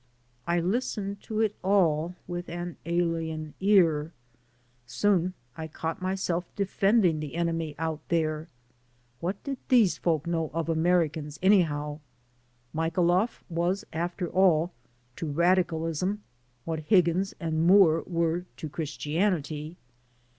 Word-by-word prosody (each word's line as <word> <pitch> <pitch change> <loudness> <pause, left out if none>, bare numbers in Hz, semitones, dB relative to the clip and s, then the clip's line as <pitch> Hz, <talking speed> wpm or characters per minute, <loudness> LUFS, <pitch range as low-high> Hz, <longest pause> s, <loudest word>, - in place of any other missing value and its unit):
I 170 0 +2
listened 200 +1 -2
to 220 0 -2
it 215 -2 +1
all 175 -4 +2
with 175 0 -5
an 175 0 -5
alien 165 -3 -1
ear. 170 -6 +3 0.7
Soon 180 +7 +1 0.2
I 160 -1 -5
caught 160 +2 -4
myself 185 -2 -1
defending 195 -3 +2
the 150 0 -6
enemy 165 -3 -1
out 160 -1 -2
there. 155 -1 0 0.7
What 185 +6 -3
did 275 -2 -4
these 230 -8 +4
folk 160 -3 0
know 165 -2 -1
of 165 0 -1
Americans, 160 -2 +1
anyhow? 150 -7 +2 0.7
Michailoff 175 +6 +1
was, 175 +3 -1
after 175 +2 -2
all, 175 -2 +3 0.5
to 165 - -3
radicalism 170 +3 +1 0.4
what 160 -1 -2
Higgins 180 +4 +2
and 160 -1 0
Moore 175 -4 +6
were 170 0 0
to 155 - -6
Christianity. 155 0 -2
170 Hz, 115 wpm, -28 LUFS, 160-185 Hz, 0.7 s, Moore